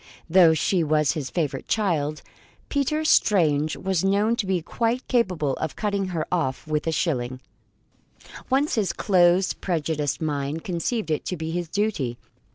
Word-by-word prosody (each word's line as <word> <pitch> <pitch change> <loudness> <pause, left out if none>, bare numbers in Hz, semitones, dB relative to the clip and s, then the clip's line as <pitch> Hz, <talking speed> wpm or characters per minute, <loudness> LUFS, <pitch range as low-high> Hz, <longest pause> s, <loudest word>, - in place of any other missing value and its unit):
Though 170 -2 +6
she 170 +3 +1
was 150 -1 +2
his 140 -5 -4
favourite 145 -6 -2
child, 155 -8 0 0.5
Peter 305 +2 0
Strange 155 - +3
was 190 -3 -1
known 205 +4 +2
to 215 -6 -2
be 190 -2 +1
quite 235 +7 -1
capable 180 - +1
of 160 - -4
cutting 200 -2 -1
her 165 -4 -2
off 155 -8 -1
with 155 0 -2
a - - +2
shilling, 130 -7 -1 1.1
once 275 +3 +2
his 210 -5 0
close, 180 -1 +3
prejudiced 155 -5 -2
mind 150 0 -2
conceived 180 +1 -2
it 155 - -1
to 180 - -3
be 160 0 -4
his 175 -1 -3
duty. 180 - -1
170 Hz, 155 wpm, -24 LUFS, 155-200 Hz, 1.1 s, Though